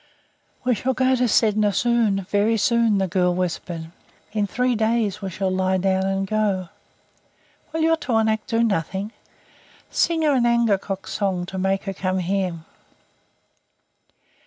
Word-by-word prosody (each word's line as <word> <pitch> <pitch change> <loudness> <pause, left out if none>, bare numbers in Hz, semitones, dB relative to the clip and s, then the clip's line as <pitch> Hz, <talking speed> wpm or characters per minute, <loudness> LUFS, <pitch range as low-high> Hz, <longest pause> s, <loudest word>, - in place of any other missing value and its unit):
"We 255 -1 +2
shall 255 +4 -1
go 260 +1 +2
to 250 0 +1
Sedna 215 -2 +3
soon 220 -2 +1
very 210 +3 +2
soon," 230 -1 +2
the 190 -1 +1
girl 180 0 +1
whispered. 170 -2 -4 0.4
"In 210 -1 0
three 250 +5 0
days 220 -2 0
we 195 - -3
shall 190 +1 -2
lie 185 0 +1
down 190 0 +1
and 195 0 -1
go. 195 -3 -1 1.0
Will 320 +1 -2
your 325 0 +3
tornaq 225 -6 +1
do 230 0 +1
nothing? 200 0 -1 0.8
Sing 330 -1 +1
her 300 -2 +3
an 245 -3 +3
angekok's 205 -5 0
song 190 -4 -1
to 190 +1 -6
make 190 +1 0
her 195 - -4
come 185 0 -2
here." 185 -2 -1
205 Hz, 145 wpm, -22 LUFS, 190-235 Hz, 1.0 s, Sedna